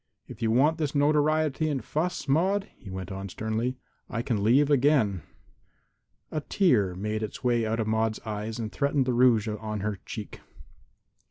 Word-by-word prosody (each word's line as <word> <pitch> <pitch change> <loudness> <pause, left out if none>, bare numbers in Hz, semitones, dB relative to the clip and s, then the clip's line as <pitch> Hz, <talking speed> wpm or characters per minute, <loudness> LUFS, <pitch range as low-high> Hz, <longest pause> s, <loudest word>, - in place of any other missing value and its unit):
If - - -11
you 115 - +1
want 145 +8 +3
this 150 -2 -2
notoriety 155 +1 +2
and 140 -3 -3
fuss, 170 +2 -2
Maude," 190 +8 +2
he 100 - -12
went 95 0 -6
on 95 +1 -5
sternly, 110 +6 -2 0.3
"I 115 -2 -2
can 115 -5 -1
leave 140 +7 +4
again." 130 - +3 1.1
A 155 - -2
tear 115 - +2
made 105 +3 -3
its 110 +3 -6
way 120 -2 +2
out 115 +1 -1
of 110 - 0
Maude's 110 0 0
eyes 110 0 -4
and 110 -2 -4
threatened 140 -1 +1
the 125 - 0
rouge 120 -3 +4
on 105 -1 -4
her 105 -1 -3
cheek. 105 -3 -7
115 Hz, 170 wpm, -27 LUFS, 110-145 Hz, 1.1 s, leave